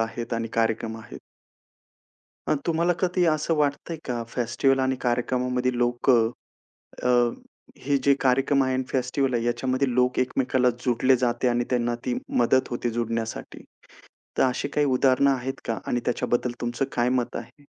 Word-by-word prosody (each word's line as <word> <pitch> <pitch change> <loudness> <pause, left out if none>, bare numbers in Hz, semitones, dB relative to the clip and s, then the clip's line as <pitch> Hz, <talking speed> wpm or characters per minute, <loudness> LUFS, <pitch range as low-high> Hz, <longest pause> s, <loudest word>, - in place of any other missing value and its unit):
आहेत 115 +1 -3
आणि 115 0 -2
कार्यक्रम 115 0 0
आहेत. - - -11 1.3
मग 150 - +2
तुम्हाला 170 +1 +2
कधी 180 0 +1
असं 155 0 +1
वाटतंय 150 +2 -1
का 120 -2 -2
फेस्टिव्हल 125 +3 +1
आणि 130 0 +1
कार्यक्रमामध्ये 125 +1 0
लोक 120 +1 0
अ, 115 -1 +1 1.3
हे 140 +1 +1
जे 140 - +5
कार्यक्रम 135 +1 +3
आहे 130 0 0
अन् 130 0 0
फेस्टिव्हल 130 +1 0
आहे 115 - 0
याच्यामध्ये 130 +2 0
लोक 125 +1 +2
एकमेकांला 130 0 +1 0.2
जुडले 130 +2 +3
जाते 120 0 0
आणि 120 0 +1
त्यांना 120 -1 0
ती 125 - 0 0.3
मदत 125 +2 +3
होते 120 0 -2
जुडण्यासाठी? 115 -1 -4 0.8
तर - - +5
अशी 130 +2 -2
काही 145 +1 +1
उदाहरणं 135 +1 +3
आहेत 135 0 -3
का? 115 -2 -2
आणि 120 - 0
त्याच्याबद्दल 120 0 0
तुमचं 120 +2 -1
काय 120 0 +1
मत 120 - -5
आहे? 120 +5 -10
125 Hz, 150 wpm, -25 LUFS, 120-135 Hz, 1.3 s, जे